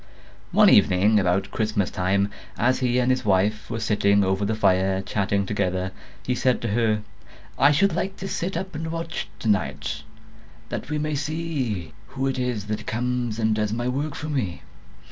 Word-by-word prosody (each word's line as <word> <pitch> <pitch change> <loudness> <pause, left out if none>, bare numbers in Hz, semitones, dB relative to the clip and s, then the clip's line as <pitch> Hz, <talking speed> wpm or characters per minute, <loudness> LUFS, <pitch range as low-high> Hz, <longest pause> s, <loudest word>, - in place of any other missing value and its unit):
One - - +6
evening, 105 +4 +5
about 95 0 +1
Christmas 105 -3 0
time, 100 +2 +1 0.3
as 130 +3 +2
he 125 -1 +1
and 125 0 +3
his 130 - 0
wife 105 +2 +1
were 115 - -3
sitting 100 -2 +3
over 95 +1 0
the 110 +2 0
fire 95 -2 +2
chatting 100 0 0
together, 95 -2 -1 0.3
he 125 - +1
said 125 0 +1
to 115 - -1
her, 110 -1 +1 0.6
'I 140 - +6
should 180 +4 +3
like 190 +3 -2
to 195 - -5
sit 190 0 -2
up 190 0 -5
and 160 +1 -4
watch 165 -7 -4
tonight, 80 - -1 0.7
that - - -5
we 150 - -1
may 155 0 -1
see 140 - -3
who 135 0 -3
it 135 -1 -1
is 125 -5 -2
that 105 0 -4
comes 120 -1 -1
and 110 -1 +2
does 105 0 0
my 120 +2 -2
work 145 +4 -2
for 155 - -5
me. 115 - -2
110 Hz, 180 wpm, -24 LUFS, 100-135 Hz, 0.7 s, One